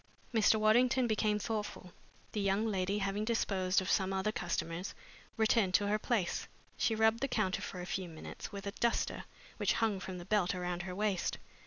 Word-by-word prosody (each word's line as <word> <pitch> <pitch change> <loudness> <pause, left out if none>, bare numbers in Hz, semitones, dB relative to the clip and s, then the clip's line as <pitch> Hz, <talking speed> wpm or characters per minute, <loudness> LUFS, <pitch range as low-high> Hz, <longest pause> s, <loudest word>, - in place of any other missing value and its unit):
Mr. 220 -1 +5
Waddington 245 +4 +4
became 215 -2 +1
thoughtful. 210 -4 -4 0.4
The 210 - -2
young 200 +2 +2
lady, 195 -2 0
having 200 +1 -1
disposed 195 -5 +1
of 185 - -1
some 190 -1 +2
other 190 +2 0
customers, 175 -1 -3 0.4
returned 220 -4 +3
to 205 - +4
her 210 +1 +1
place. 215 -7 0 0.3
She 225 - +1
rubbed 220 +1 +3
the 275 - 0
counter 195 -6 0
for 185 -3 -5
a - - -5
few 185 -1 -3
minutes 160 +6 -8
with 200 -1 -7
a 200 - -2
duster 235 +3 0 0.3
which - - +2
hung 220 -4 +1
from 185 -1 -6
the 175 - -8
belt 195 -3 +2
around 180 -1 -2
her 180 0 -5
waist. 205 -2 0
200 Hz, 185 wpm, -33 LUFS, 185-220 Hz, 0.4 s, Mr